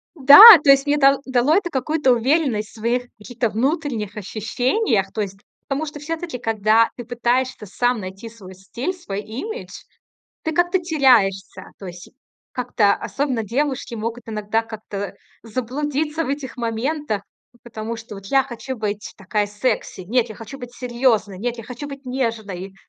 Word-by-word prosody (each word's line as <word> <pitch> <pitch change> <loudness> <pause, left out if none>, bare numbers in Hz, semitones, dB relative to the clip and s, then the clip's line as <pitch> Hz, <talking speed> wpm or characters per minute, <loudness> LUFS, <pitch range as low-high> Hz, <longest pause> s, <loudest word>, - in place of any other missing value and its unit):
Да, 285 +2 +9 0.2
то 275 - +6
есть 275 +1 +5
мне 290 +1 +2
это 275 -1 +5
да 255 -2 +1
дало 300 +5 +3
это 360 -3 +1
какую-то 270 0 +1
уверенность 245 -3 +1
в - - -20
своих 235 +3 -1
каких-то 235 +1 -3
внутренних 240 - -2
ощущениях. 215 - -1
То 220 - -4
есть, 195 -1 -6 0.3
потому 285 +3 -2
что 295 0 -8
всё-таки, 325 -2 -5
когда 225 0 +2
ты 240 - -7
пытаешься 245 -1 -1
сам 245 +4 0
найти 195 +4 -8
свой 200 -5 -13
стиль, 235 - -5
свой 205 - -6
имидж, 340 - -7 0.7
ты 320 - -2
как-то 350 +3 +2
теряешься. 235 - +2
То 195 - -9
есть 180 0 -10 0.4
как-то, 235 -5 +1
особенно 260 -6 -3
девушки, 260 +1 -2
могут 230 +2 -5
иногда 215 +1 -1
как-то 215 -3 -7 0.3
заблудиться 290 +7 -2
в - - -6
этих 275 -2 -4
моментах, 235 0 -2 0.3
п 240 - -25
потому 225 -1 -6
что: 225 -2 -10
"Вот 195 - -11
я 270 +5 +3
хочу 260 +1 -7
быть 210 -2 -4
такая 205 +1 -1
секси. 210 -1 -2
Нет, 235 +6 0
я 220 - -8
хочу 250 +6 -10
быть 245 0 -10
серьёзной. 235 -6 0
Нет, 240 +3 -3
я 230 - -8
хочу 250 +5 -7
быть 275 -1 -10
нежной". 220 -7 -4
240 Hz, 165 wpm, -21 LUFS, 215-275 Hz, 0.7 s, Да